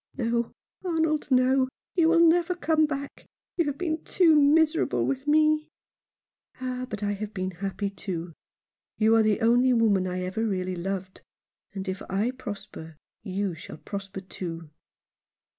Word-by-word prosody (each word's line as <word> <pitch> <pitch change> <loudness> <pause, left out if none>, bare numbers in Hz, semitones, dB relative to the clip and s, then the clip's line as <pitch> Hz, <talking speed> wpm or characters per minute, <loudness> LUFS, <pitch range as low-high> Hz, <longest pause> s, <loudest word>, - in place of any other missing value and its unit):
"No, 235 -1 0 0.3
Arnold, 320 -4 0
no 260 0 +4
— - - -68
you 330 -3 +4
will 335 0 +6
never 350 +2 +3
come 315 -2 +2
back. 280 -1 -6 0.3
You 340 - +1
have 285 -1 -2
been 320 -3 -2
too 340 -4 +4
miserable 305 +1 +3
with 275 +1 -2
me." 305 0 +3 0.9
"Ah, 255 0 -4
but 210 -2 -5
I 205 - 0
have 210 +1 -5
been 185 0 -2
happy, 195 +2 -3
too. 175 -4 -5 0.6
You 220 +1 +4
are 225 - +5
the 215 +1 +2
only 245 +3 +4
woman 210 -5 +3
I 185 0 -3
ever 185 +5 -2
really 185 -4 -1
loved; 185 +1 -5 0.5
and 190 0 -5
if 190 +1 -3
I 205 +6 0
prosper 205 - -8 0.2
you 195 -2 -2
shall 160 -1 -10
prosper 195 +1 -7
too." 165 -4 -7
225 Hz, 155 wpm, -26 LUFS, 190-295 Hz, 0.9 s, will